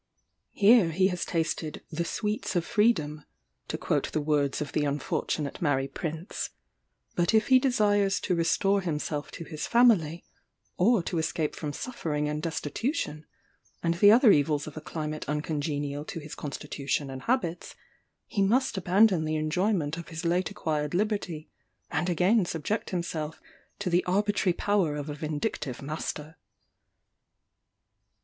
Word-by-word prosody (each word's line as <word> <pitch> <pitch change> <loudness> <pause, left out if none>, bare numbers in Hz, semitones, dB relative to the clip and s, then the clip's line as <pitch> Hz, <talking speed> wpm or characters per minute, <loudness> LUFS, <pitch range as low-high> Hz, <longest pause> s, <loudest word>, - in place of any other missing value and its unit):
Here 205 -3 +6
he 185 +4 +3
has 180 -1 -2
tasted 160 -2 -2
"the 170 +2 -1
sweets 210 +1 -2
of 175 -1 +1
freedom," 155 -10 +1 0.4
to - - -3
quote - - -1
the - - +1
words 145 -2 +1
of 150 - -4
the 150 - 0
unfortunate 145 +1 -2
Mary 135 -4 +1
Prince; 160 +5 -4 0.6
but 175 +5 +2
if 220 - +3
he 260 -1 +7
desires 205 -6 +2
to - - 0
restore 195 +4 +2
himself 150 -3 -3
to - - -6
his 155 -2 -5
family, 200 -10 +4 0.5
or 205 +1 +3
to 170 0 -2
escape 160 -1 -1
from 150 -2 -4
suffering 150 - -3
and 150 0 -2
destitution, 160 - -3 0.6
and 170 0 +2
the 205 +4 +6
other 230 0 +7
evils 145 -1 +2
of 155 - -9
a 155 - -6
climate 155 -1 -5
uncongenial 145 -1 -2
to 165 - -5
his 150 0 -9
constitution 140 -1 -3
and 130 0 -7
habits, 230 -9 -1 0.5
he 205 - -2
must 230 +3 +2
abandon 190 -1 +4
the 155 0 -1
enjoyment 160 0 0
of 170 - -7
his 160 +1 -6
late 175 +1 +1
acquired 150 0 -2
liberty, 195 -6 -1 0.4
and 175 - 0
again 185 +5 +3
subject 170 +5 -2
himself 165 -4 -3 0.4
to 200 - -4
the 175 0 +3
arbitrary 200 0 +2
power 185 -5 +1
of 150 0 -4
a - - -3
vindictive 150 - -3
master. 150 +1 -5
165 Hz, 145 wpm, -28 LUFS, 150-200 Hz, 0.6 s, he